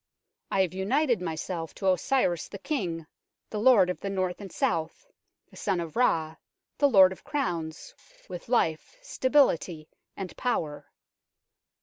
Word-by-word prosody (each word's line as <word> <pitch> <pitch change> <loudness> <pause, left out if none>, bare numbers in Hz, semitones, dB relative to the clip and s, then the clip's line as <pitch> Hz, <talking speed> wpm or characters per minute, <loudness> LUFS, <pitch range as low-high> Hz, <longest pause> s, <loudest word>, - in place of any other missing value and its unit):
I 195 - +2
have 185 - -3
united 235 +4 +1
myself 165 0 -4
to 190 -1 +2
Osiris 180 - +1
the 200 - -8
King, 180 - -3 0.5
the 215 - -3
lord 220 -5 +6
of 180 - -3
the 200 - -4
North 185 -1 -2
and 195 -3 -8
South, 160 - -1 0.5
the - - -16
Son 195 -3 -1
of 165 -2 -5
Ra, 160 -10 +1 0.4
the 285 0 +5
Lord 190 -6 +7
of 190 - -10
Crowns, 175 - -3 0.3
with 180 +3 -8
life, 200 - 0
stability 255 - +1 0.3
and 190 -2 -6
power. 160 - -2
185 Hz, 140 wpm, -28 LUFS, 165-240 Hz, 0.5 s, Lord